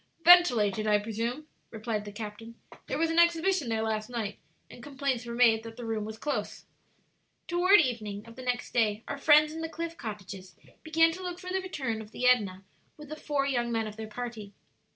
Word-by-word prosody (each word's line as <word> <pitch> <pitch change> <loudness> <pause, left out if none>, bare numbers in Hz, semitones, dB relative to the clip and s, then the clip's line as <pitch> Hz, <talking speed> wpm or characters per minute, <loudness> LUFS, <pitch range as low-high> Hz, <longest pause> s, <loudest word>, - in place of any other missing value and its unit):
"Ventilated, 225 - +6
I 210 -1 +5
presume," 230 +7 -4 0.2
replied 220 -1 -4
the 205 - -7
captain. 220 +2 -8 0.3
"There - - -2
was 330 +1 +1
an 330 - +2
exhibition 340 -3 +3
there 220 -1 0
last 220 0 -2
night, 225 -4 -4 0.3
and - - -13
complaints 270 -3 -3
were 235 - -5
made 230 -2 +4
that 225 0 -10
the 240 - -7
room 220 -2 -2
was 220 0 -7
close." 295 +5 -4 0.8
Toward 365 +4 +5
evening 220 -8 -2
of 230 0 -13
the 260 - -9
next 250 -1 -3
day 220 -2 +1
our - - -5
friends 300 +1 +5
in 325 - -6
the 325 - -4
cliff 335 +1 -5
cottages 195 -3 -8 0.3
began 325 +1 +3
to 365 +3 -8
look 355 -1 -5
for 365 0 -7
the 380 0 0
return 265 -12 -4
of 215 - -11
the 250 - -4
Edna 200 -7 +2 0.3
with 300 -2 -12
the 310 - -5
four 290 -2 -1
young 240 -3 -1
men 225 -1 0
of 215 -1 -7
their 220 0 -7
party. 220 -3 -7
235 Hz, 205 wpm, -29 LUFS, 215-305 Hz, 0.8 s, Ventilated